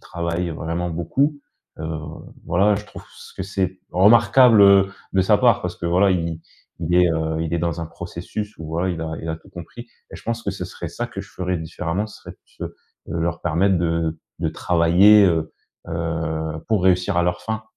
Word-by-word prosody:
travaille 85 +1 -3
vraiment 85 +2 -3
beaucoup. 135 - 0 0.4
Heu, 80 - -5 0.6
voilà, 95 +5 +3
je 105 - -6
trouve - - -11
ç - - -15
que - - -3
c'est 95 -1 -2
remarquable, 115 +4 +6
heu, 100 -1 +6 0.2
de 95 - +3
sa 105 +2 +4
part 120 -2 +4
parce 90 -1 -3
que 85 - -4
voilà, 90 +3 +3
i 85 -2 -2 0.4
il 85 0 -1
est, 90 0 +5
heu, 80 0 -1
il 80 0 -3
est - - 0
dans 85 0 -2
un 85 - -4
processus 90 +5 -6
où, 80 - -7
voilà, 85 +4 -1
il 85 -2 -4
a 80 -1 -4
il 80 - -6
a 80 - -2
tout 80 - -20
compris. 95 +6 -10 0.3
Et - - -7
je - - -14
pense 115 0 -3
que 100 - -2
ce 95 -1 -5
serait 90 - -7
ça - - -4
que - - -7
je - - -16
ferai 90 0 -2
différemment, 85 +4 -3
ça 105 - -13
serait - - -10
plus, - - -9
heu, - - -14 0.4
leur 85 0 -1
permettre 90 +4 +2
de 85 -1 -1 0.2
de - - -1
travailler, 90 +5 +5
heu, 80 -4 +1 0.4
heu, 80 -1 -3
pour 110 -4 +2
réussir 90 -1 +2
à 85 - +4
leur 90 0 -1
fin. 110 0 -4
90 Hz, 210 wpm, -22 LUFS, 85-100 Hz, 0.6 s, remarquable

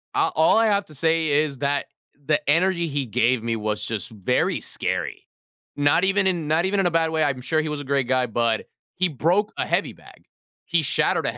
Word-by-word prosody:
A - - +2
all 160 +7 +4
I 225 0 +4
have 200 -1 +1
to 155 - -14
say 160 +2 +1
is 145 -1 +1
that 140 0 0 0.4
the 150 +1 0
energy 170 +1 +2
he 140 -2 -2
gave 120 +2 +1
me 115 -1 -1
was 105 -1 -2
just 110 0 -4
very 100 -4 0
scary. - - -3 0.5
Not 145 +5 +2
even 195 0 +2
in 170 -5 -1
not 160 +4 +2
even 200 +1 0
in 195 - +2
a 175 - +2
bad 165 -1 +1
way, 160 -1 0
I'm 135 -3 -1
sure 155 +4 0
he 155 - -4
was 150 -1 -4
a 145 - -6
great 135 -2 0
guy, 130 -1 +1
but 115 0 -1 0.3
he 185 0 +1
broke 180 - +1
a - - -1
heavy - - -1
bag. - - -18 0.4
He 170 -1 +1
shattered - - +1
a - - -2
155 Hz, 220 wpm, -23 LUFS, 130-170 Hz, 0.5 s, all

